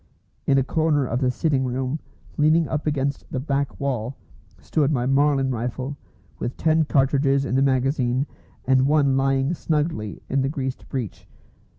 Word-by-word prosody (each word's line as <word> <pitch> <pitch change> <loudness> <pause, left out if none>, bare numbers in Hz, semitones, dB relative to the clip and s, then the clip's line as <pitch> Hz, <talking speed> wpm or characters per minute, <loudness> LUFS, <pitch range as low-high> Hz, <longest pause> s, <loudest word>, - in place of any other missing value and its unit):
In 135 - +4
a 135 - +4
corner 150 0 +1
of 125 +1 -2
the 130 - +3
sitting 135 +1 +1
room, 130 +3 -2 0.4
leaning 155 +2 +3
up 155 0 -2
against 140 -1 -2
the 130 - -2
back 140 0 -2
wall, 130 -2 -2 0.4
stood 150 -2 0
my 125 -4 0
Marlin 135 0 +2
rifle, 125 +3 -3 0.4
with 120 - -4
ten 160 0 +3
cartridges 140 0 +2
in 130 - -3
the 135 - +3
magazine 130 -1 +1 0.4
and 130 0 +4
one 140 -2 +3
lying 135 +2 +1
snugly 150 - -2
in 135 - +1
the 135 - 0
greased 130 -3 -4
breech. 125 -7 -5
135 Hz, 160 wpm, -23 LUFS, 130-145 Hz, 0.4 s, In